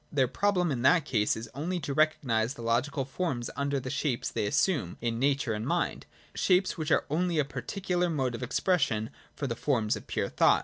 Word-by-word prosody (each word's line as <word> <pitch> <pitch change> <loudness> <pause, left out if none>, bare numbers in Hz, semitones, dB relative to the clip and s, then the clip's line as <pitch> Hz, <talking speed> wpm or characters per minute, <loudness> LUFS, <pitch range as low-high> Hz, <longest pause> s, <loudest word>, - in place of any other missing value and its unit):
Their 135 -3 +3
problem 180 +3 +1
in 125 -3 -1
that 145 +4 +4
case 110 -8 +1
is 110 - -6
only 170 +7 -2
to 140 -1 -3
recognise 135 -6 +1
the 115 - -8
logical 130 +4 0
forms 135 -4 -3
under 140 0 0
the 130 0 -5
shapes 130 -6 -1
they 105 - -1
assume 140 - +1
in 115 -1 -2
Nature 135 -3 +1
and 105 0 -3
Mind, - - -1 0.2
— - - -27
shapes 185 0 +2
which 155 -3 -3
are - - +3
only 170 +1 +1
a 150 - +3
particular 175 - -2
mode 135 -6 0
of 115 - -5
expression 120 - +1 0.2
for 140 - -3
the 115 -4 -2
forms 115 -4 +1
of - - -9
pure - - -1
thought. - - +4
140 Hz, 210 wpm, -29 LUFS, 120-160 Hz, 0.2 s, that